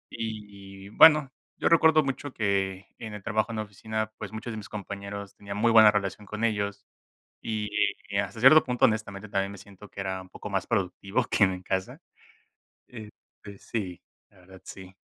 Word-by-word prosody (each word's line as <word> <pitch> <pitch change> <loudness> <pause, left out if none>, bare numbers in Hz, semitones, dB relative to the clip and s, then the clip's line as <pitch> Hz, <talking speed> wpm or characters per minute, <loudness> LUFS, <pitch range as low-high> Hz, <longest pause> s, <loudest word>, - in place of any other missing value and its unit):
y 100 -3 -8
bueno, 150 +2 +7 0.3
yo - - +1
recuerdo 160 -2 +5
mucho 135 0 -4
que 100 -2 -1
en 110 -2 -7
el 100 - -10
trabajo 110 0 -1
en - - -5
la 110 - -2
oficina, 110 +2 -4
pues, - - -6
muchos 110 +1 -6
de - - -6
mis 105 - -9
compañeros 100 -1 -7
tenía 100 0 -8
muy 115 +2 +2
buena 110 -2 +8
relación 100 0 -2
con 105 +2 -5
ellos 100 -2 -1 0.6
y, 110 -2 -3 0.5
hasta 110 - -3
cierto 135 +6 +8
punto, 125 -1 +2
honestamente, 110 -2 -2
también 100 0 -1
me 100 - -10
siento 100 +1 -14
que 100 - -7
era 95 -1 -3
un 95 - -15
poco 105 - -9
más 95 -2 -1
productivo 100 +2 -1
que 105 - +5
en 95 - 0
mi 90 0 -8
casa, 95 0 -3 0.9
este, 105 -3 -13
sí, 95 -6 -5 0.3
la 95 -3 -23
verdad, 95 0 -15
sí. 95 0 -11
105 Hz, 185 wpm, -27 LUFS, 100-110 Hz, 0.9 s, buena